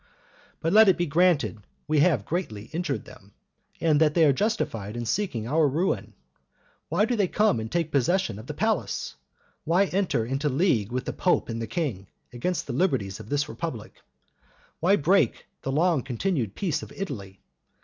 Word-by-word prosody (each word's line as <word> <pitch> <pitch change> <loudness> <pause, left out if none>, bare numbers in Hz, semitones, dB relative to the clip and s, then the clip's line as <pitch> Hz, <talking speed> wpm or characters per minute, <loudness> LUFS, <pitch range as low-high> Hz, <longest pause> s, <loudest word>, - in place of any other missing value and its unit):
But 165 +2 0
let 220 -1 +8
it 185 - +4
be 175 - +1
granted 165 -6 +2 0.3
we 155 -1 +2
have 145 - +3
greatly 115 - -4
injured 165 -4 -2
them, 100 +1 -15 0.5
and 155 -2 +3
that 150 -1 +3
they 165 -2 +5
are 140 - +5
justified 120 - -2
in 120 - -3
seeking 115 - -1
our 155 +3 +3
ruin; 165 +8 -1 0.7
why 210 - +2
do 245 - 0
they 205 -4 +2
come 210 - +2
and 110 +1 -5
take 165 -2 -1
possession 140 - +1
of 110 - -11
the - - -4
palace? - - -1 0.5
Why 175 +5 +3
enter 185 - 0
into 135 +4 -1
league 130 - +1
with 125 +1 -2
the - - -3
pope 180 - +1
and 115 0 -3
the 115 - -3
king, 115 - -3 0.3
against 175 +9 -2
the 135 - -5
liberties 125 - 0
of - - -10
this 145 0 0
republic? 145 -11 -6 0.9
Why 185 +5 +4
break 160 - +2 0.2
the 135 - -3
long 160 0 +2
continued 125 - -2
peace 160 -6 -1
of - - -10
Italy? 100 - -6
150 Hz, 180 wpm, -26 LUFS, 115-180 Hz, 0.9 s, let